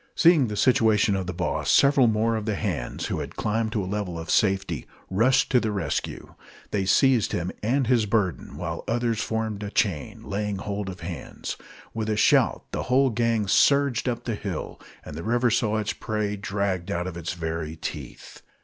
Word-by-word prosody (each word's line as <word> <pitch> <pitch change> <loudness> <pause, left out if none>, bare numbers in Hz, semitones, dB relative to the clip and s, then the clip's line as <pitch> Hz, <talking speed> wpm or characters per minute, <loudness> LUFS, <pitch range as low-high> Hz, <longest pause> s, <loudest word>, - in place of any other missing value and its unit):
Seeing 165 -7 +5
the 105 - -4
situation 110 -4 +3
of 95 -2 -3
the - - -2
boss, 80 -5 -2
several 140 -3 +5
more 110 +1 +1
of 110 0 -4
the 105 - 0
hands, 90 - -3
who - - -2
had - - -6
climbed 110 +1 -1
to 105 - 0
a - - -4
level 95 -3 -3
of 80 0 -5
safety, 95 - +1 0.2
rushed 115 +7 +3
to 125 - +5
the 110 -2 -1
rescue. 100 -2 -3 0.4
They 100 -2 0
seized 125 +1 +3
him 90 +1 -1
and 130 +5 +1
his 115 -3 +2
burden, 100 -4 -1
while - - -4
others 115 -1 0
formed 110 -2 -2
a 105 - -4
chain, 95 -9 -1
laying 105 0 -2
hold 100 0 -4
of 90 -1 -8
hands. 85 0 -6 0.4
With 110 -1 -3
a 105 - 0
shout - - +3
the - - -2
whole 130 +1 +4
gang 115 -2 +1
surged 140 +2 +3
up 120 - -3
the 115 - -2
hill, 100 -5 -5 0.2
and 75 - -8
the 80 - -5
river 120 +4 +1
saw 110 -1 +1
its 110 -1 -1
prey 105 -2 -2
dragged 100 -2 -2
out 90 -2 -1
of 90 -2 -5
its 85 -1 -4
very 80 -2 -4
teeth. 80 - -8
105 Hz, 195 wpm, -25 LUFS, 95-115 Hz, 0.4 s, Seeing